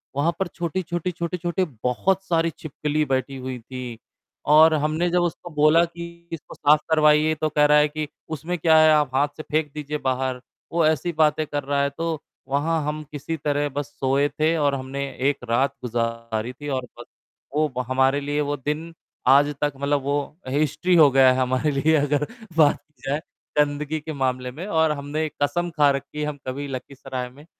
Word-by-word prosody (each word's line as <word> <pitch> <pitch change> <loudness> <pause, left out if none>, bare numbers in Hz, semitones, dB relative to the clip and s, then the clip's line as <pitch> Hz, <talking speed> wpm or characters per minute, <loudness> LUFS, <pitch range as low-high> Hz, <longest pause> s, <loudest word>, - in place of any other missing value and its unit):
वहाँ 145 +4 +2
पर 190 - 0
छोटी-छोटी 175 0 -3
छोटी-छोटी, 175 +1 -2 0.2
बहुत 185 +10 +1
सारी 165 -2 +1
छिपकली 150 0 -2
बैठी 135 0 -1
हुई 130 -1 -5
थी 125 0 -7 0.5
और 160 +2 +7
हमने 155 +3 +1
जब 175 +1 +2
उसको 175 0 -3
बोला 155 +3 +5
कि, 170 0 -10
"इसको 165 - -8
साफ 150 +1 +4
करवाइए," 155 0 +4
तो 155 0 -1
कह 150 -1 +3
रहा 150 0 +6
है 150 0 +5
कि, 155 0 -4 0.2
"उसमें 160 +3 -3
क्या 160 -1 +4
है 155 0 +7
आप 150 -4 +2
हाथ 140 +2 +3
से 155 - -6
फेंक 155 -1 0
दीजिए 150 0 -4
बाहर," 130 -1 -1 0.3
वो 170 -1 +2
ऐसी 155 +2 +1
बातें 155 0 +2
कर 145 0 -3
रहा 140 0 0
है, 140 - +1
तो 160 +1 -3 0.3
वहाँ 150 +4 0
हम 155 +1 -3
किसी 150 +2 -4
तरह 145 0 0
बस 145 0 -4
सोए 135 +2 +2
थे 155 +3 +1
और 145 -2 +2
हमने 135 +1 -4 0.2
1 140 -3 -4
रात 130 +4 +2
गुजारी 115 -1 -2
थी 145 +3 -9
और 130 - -4
बस, - - -8 0.5
वो 155 +1 +3
व - - +2
हमारे 130 +2 +2
लिए, 145 +1 -1
वो 145 0 -1
दिन 150 +5 -4 0.3
आज 145 +3 +5
तक 145 -1 +1
मतलब 140 +1 0
वो 140 +2 -1 0.3
हिस्ट्री 150 +6 +1
हो 155 -4 +8
गया 130 -1 +6
है 130 - 0
हमारे 130 +4 +1
लिए 150 +3 +2
अगर 145 0 +1 0.3
बात 150 -3 +5
की 150 -5 -35
जाए 145 +2 0 0.4
गंदगी 150 +1 +1
के 155 +1 -6
मामले 130 -2 -1
में 160 +8 -7
और 160 -5 +2
हमने 150 +2 -2
कसम 175 +5 0
खा 145 -1 +6
रखी 140 +2 -5
है, - - 0
हम 150 -1 -4
कभी 140 +2 -4
लखीसराय 130 -1 -6
में 140 +4 -16
150 Hz, 195 wpm, -23 LUFS, 135-155 Hz, 0.5 s, हो